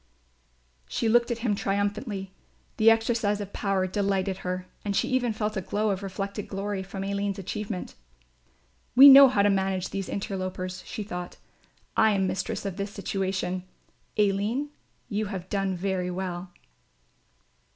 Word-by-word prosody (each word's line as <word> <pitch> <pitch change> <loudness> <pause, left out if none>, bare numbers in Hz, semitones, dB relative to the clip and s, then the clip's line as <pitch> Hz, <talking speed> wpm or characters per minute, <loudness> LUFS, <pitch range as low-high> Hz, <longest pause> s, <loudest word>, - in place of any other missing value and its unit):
She 230 - -1
looked 240 +2 +4
at 235 - -1
him 215 - +2
triumphantly, 200 0 -2 0.4
the 220 +1 +6
exercise 225 -2 +2
of 200 -1 -6
power 195 -2 0
delighted 195 -1 0
her 185 -1 -4 0.2
and 200 -1 -2
she - - +2
even 255 -2 +1
felt 215 0 -2
a 190 - -1
glow 210 +3 0
of 190 0 -2
reflected 200 +1 -4
glory 200 0 -3
from 195 0 -6
Aline's 200 0 -2
achievement. 195 0 -5 1.0
"We 270 +3 +11
know 275 0 +11
how 210 -6 +2
to 205 - +4
manage 190 -1 0
these 195 -1 -4
interlopers," 185 -2 -4
she 220 - -4
thought; 180 -3 -6 0.6
"I 220 -1 +5
am 195 -1 +1
mistress 190 +2 -3
of 195 -1 -4
this 200 0 -3
situation. 190 -2 -2 0.6
Aline, 210 +8 +1 0.4
you 215 -1 -2
have 190 -3 -6
done 195 -2 0
very 185 0 -1
well." 180 0 -4
200 Hz, 150 wpm, -27 LUFS, 190-210 Hz, 1.0 s, We